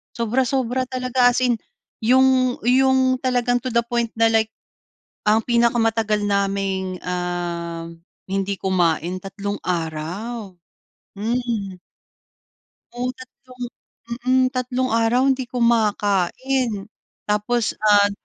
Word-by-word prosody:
sobra-sobra 255 +2 0
talaga, 255 -1 +2
as 245 - 0
in, 245 -1 +3 0.4
yung 255 +1 +3
yung 260 +1 +3
talagang 245 -2 +1
to 255 +1 -4
the 235 0 +2
point 235 -1 -1
na, 225 - +6
like, 220 0 +2 0.8
ang 215 +1 +5
pinakamatagal 225 -3 +2
naming, 195 -2 -1
ah, 175 -2 -3 0.4
hindi 195 +1 -1
kumain, 175 -2 +1
tatlong 200 +1 -5
araw. 180 +6 -4 0.6
Hmm. 225 -3 -2 1.2
Oo, 245 +1 -2
tatlong, 255 0 -12 0.6
mm, 260 0 +4
tatlong 255 0 -1
araw 230 +2 +3
hindi 265 -2 +1
kumakain. 225 -1 0 0.3
Tapos, 210 +3 0
ah 205 -1 +5
230 Hz, 100 wpm, -22 LUFS, 195-250 Hz, 1.2 s, na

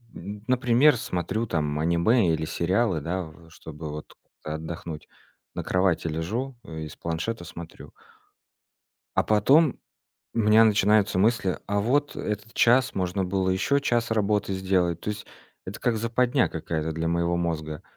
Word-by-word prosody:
м, 105 +1 -8
например, 125 +2 +4
смотрю, 90 +5 -2
там, 75 -6 -1
аниме 85 +4 +3
или 80 0 -1
сериалы, 90 +1 0
да, 90 +4 -2
в, 80 +1 -14
э, - - -18
чтобы 80 -1 -9
вот 75 +1 -8 0.3
как-то 75 0 -4
отдохнуть. 80 0 -7 0.5
На - - -3
кровати 90 -3 +1
лежу 110 +12 -3
и 80 -1 -7
с - - -11
планшета 85 +4 -3
смотрю. 85 0 -10 1.2
А - - +3
потом 130 - +4 0.6
у - - -2
меня 110 +1 +6
начинаются 105 -2 +3
мысли: 100 -3 +2
"А 100 0 0
вот 145 +7 0
этот 105 +2 -4
час 125 +2 +4
можно 95 0 -1
было 95 0 0
ещё 140 +10 +2
час 120 -4 0
работы 105 -2 +1
сделать". 90 -3 0
То 105 - -3
есть 105 - -6 0.4
это - - -7
как 120 -2 +1
западня 120 +3 +1
какая-то 80 -1 -3
для 80 +1 -2
моего 85 0 +1
мозга. 80 -3 -3
95 Hz, 155 wpm, -26 LUFS, 85-115 Hz, 1.2 s, меня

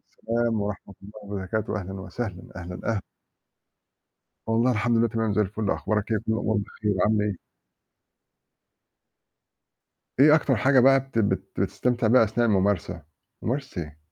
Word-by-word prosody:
السلام 115 -1 -1
ورحمة 100 -1 -5
الله 100 - -12
وبركاته 100 +2 -3
وأهلًا 95 -1 -4
وسهلًا، 95 0 -5
أهلًا، 90 0 -7 0.2
أه 100 - -2 1.5
والله 115 +3 +2
الحمد 120 +1 +1
لله، 115 0 +3
تمام 115 -1 -1
زي 105 - +1
الفل، 105 +1 -1
أخبارك 105 0 -1
إيه؟ 110 - +2
كلّ 110 +1 -2
الأمور 110 -1 0
بخير، 105 0 -2
عامل 105 0 +2
إيه؟ 105 -2 -1 2.8
إيه 150 +2 +8
أكتر 145 -4 +2
حاجة 130 +5 +4
بقى 135 +2 +6
بت 135 -3 -5
بت 100 -2 0
بتستمتع 125 -2 0
بها 115 +1 +6
أثناء 115 +2 0
الممارسة؟ 95 -5 0 0.4
ممارسة 130 -7 -3
إيه؟! 75 -1 -11
110 Hz, 140 wpm, -25 LUFS, 100-120 Hz, 2.8 s, إيه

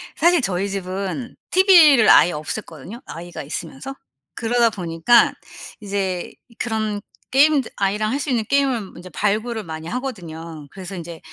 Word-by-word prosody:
사실 340 -1 +4
저희 195 -1 -1
집은 195 +5 -4 0.2
티브이를 335 - +7
아예 175 - +7
없앴거든요, 160 - -7
아이가 170 -1 -8
있으면서. 160 - -7 0.4
그러다 235 0 +2
보니까 180 +4 +3 0.5
이제 195 -3 -3 0.3
그런 215 -3 -2 0.3
게임들 280 -1 +4
아이랑 210 +2 0
할 280 - -1
수 280 - -3
있는 235 -4 +1
게임을 265 -8 0
인제 180 +1 -10
발굴을 215 +3 -1
많이 160 -1 -7
하거든요. 165 - -6
그래서 190 0 -8
인제 170 -1 -8
205 Hz, 335 characters per minute, -21 LUFS, 175-245 Hz, 0.5 s, 티브이를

